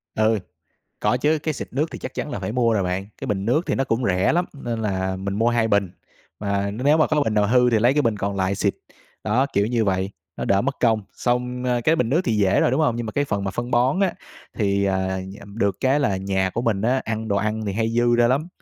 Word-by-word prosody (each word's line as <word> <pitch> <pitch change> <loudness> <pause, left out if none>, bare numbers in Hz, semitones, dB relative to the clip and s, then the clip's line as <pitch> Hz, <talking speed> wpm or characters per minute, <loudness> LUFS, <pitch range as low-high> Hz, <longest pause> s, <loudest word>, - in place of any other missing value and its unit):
Ừ, 110 0 +2 0.6
có 125 - +2
chứ, 150 +4 +1
cái 155 -2 -1
xịt - - -6
nước 145 +5 +1
thì - - -7
chắc - - -7
chắn 145 - -4
là - - -3
phải 95 +2 -4
mua 120 -2 +2
rồi 100 - +1
bạn, 90 +2 -2
cái 135 - -6
bình 100 -3 -1
nước 150 +10 +1
thì - - 0
nó 135 - 0
cũng 120 0 -1
rẻ 95 +4 +2
lắm 175 +1 +2 0.2
nên 115 -1 -2
là 95 -2 -1
mình 100 +1 -4
mua 115 +3 +2
2 120 -2 +1
bình, 100 -3 +2 0.5
mà 100 -1 -1
nếu 135 +8 +2
mà 155 - +4
có 155 -1 +1
bình 110 - -1
nào 105 -1 +3
hư 125 0 +4
thì 110 - +3
lấy 120 +4 +4
cái 150 0 +2
bình 115 -3 +1
còn 100 0 -2
lại 95 +1 0
xịt. - - 0 0.5
Đó, 120 +6 +2
kiểu 100 +1 +2
như 115 -1 +1
vậy, 95 0 0 0.3
nó - - -3
đỡ 100 0 +3
mất 135 +2 -2
công, 110 -3 +2
xong 125 +1 -1 0.2
cái 160 +1 +4
bình 120 -5 +1
nước 160 +7 +2
thì 110 - +1
dễ 95 -2 +3
rồi, - - +3
đúng 135 - +1
hông? 125 -7 +2
Nhưng 120 -1 -3
mà 110 - -5
cái 145 - +1
phần 100 -6 -2
mà 95 - -1
phân 120 +3 -4
bón 130 +10 +2
á 190 -3 +2 0.4
thì, 100 -2 +1
à, 95 -1 0 0.3
được 100 -4 0
cái 135 +3 +2
là 100 -9 +1
nhà 95 0 -1
của 115 - -3
mình 105 -4 0
á 130 +3 +2
ăn 110 0 -3
đồ 100 - +1
ăn 110 +2 -1
thì 100 - -1
hay 110 +2 0
dư 120 +1 +2
ra 120 0 +4
lắm, 145 +7 0
110 Hz, 270 wpm, -23 LUFS, 100-125 Hz, 0.6 s, mà